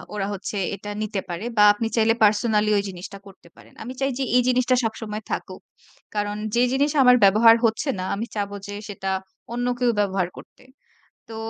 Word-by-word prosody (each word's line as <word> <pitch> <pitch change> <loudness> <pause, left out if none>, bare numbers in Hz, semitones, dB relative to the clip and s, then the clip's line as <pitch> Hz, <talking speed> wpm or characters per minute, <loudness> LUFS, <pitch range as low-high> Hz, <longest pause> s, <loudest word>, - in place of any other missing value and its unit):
ওরা 195 -1 -2
হচ্ছে 200 +1 -5 0.2
এটা 205 +1 -8
নিতে 210 -2 -2
পারে, 175 +5 -5
বা 210 - +6
আপনি 225 +2 -3
চাইলে 225 -1 +3
পার্সোনালি 210 0 +3
ঐ - - +3
জিনিসটা 185 +2 -9
করতে 195 -3 -17
পারেন। - - -18
আমি 245 +3 -7
চাই 270 0 +1
যে - - 0
এই 250 - +6
জিনিসটা 255 0 +2
সবসময় 220 -1 -4
থাকুক। - - -5 0.5
কারণ, 205 0 -1 0.2
যে 240 - +3
জিনিস 285 +2 +2
আমার 250 0 +7
ব্যবহার 220 +4 +7
হচ্ছে 225 +6 0
না 185 - -3
আমি 215 +3 -3
চাব 205 -1 -2 0.2
যে 205 - -6
সেটা 195 -1 -4 0.4
অন্য 245 +1 -2
কেউ 245 -1 +3
ব্যবহার 195 -3 0
করতে। - - -15 0.7
তো 225 - -8
215 Hz, 190 wpm, -23 LUFS, 200-235 Hz, 0.7 s, আমার